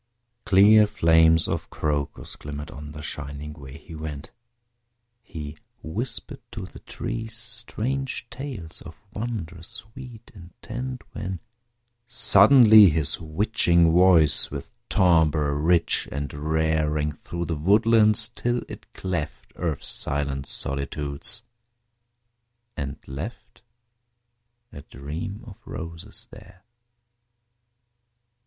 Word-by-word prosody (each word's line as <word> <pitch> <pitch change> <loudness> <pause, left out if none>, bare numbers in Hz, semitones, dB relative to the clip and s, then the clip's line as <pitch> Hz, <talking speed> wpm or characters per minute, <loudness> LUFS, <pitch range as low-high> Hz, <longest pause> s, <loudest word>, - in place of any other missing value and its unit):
Clear 105 +2 +6
flames 80 -3 +4
of - - -3
Crocus 75 -2 -3
glimmered 75 +1 -8
on 75 +1 -9
The 75 0 -9
shining 75 0 -6
way 70 -1 -11
he 80 - -13
went. 75 -2 -7 0.9
He 75 -9 -8 0.3
whispered 120 - -5
to 105 -5 -6
the - - -13
trees 115 -1 -5
strange 125 +3 -4
tales 120 - -7
Of 80 - -12
wondrous 95 -7 -5
sweet 115 +1 -11
intent, 120 +7 -8
When, 95 -3 -5 0.7
suddenly, 110 -2 +7
his 80 -1 0
witching 85 0 +2
voice 85 -3 +5
With 70 -1 -7 0.2
timbre 80 -4 +3
rich 85 +4 +2
and 70 -1 -4
rare, 80 +1 0
Rang 75 0 -1
through 85 +3 -6
the 85 - -2
woodlands 110 +5 +3
till 120 +1 -2
it - - -11
cleft 85 -5 -5
Earth's 80 -5 -3
silent 70 -1 -2
solitudes, 70 - 0 1.3
and 70 0 -5
left 75 - -8 1.1
A 70 - -9
Dream 80 - -7
of 105 -4 -12
Roses 85 -1 -8
there! 90 -1 -15
85 Hz, 105 wpm, -24 LUFS, 75-110 Hz, 1.3 s, suddenly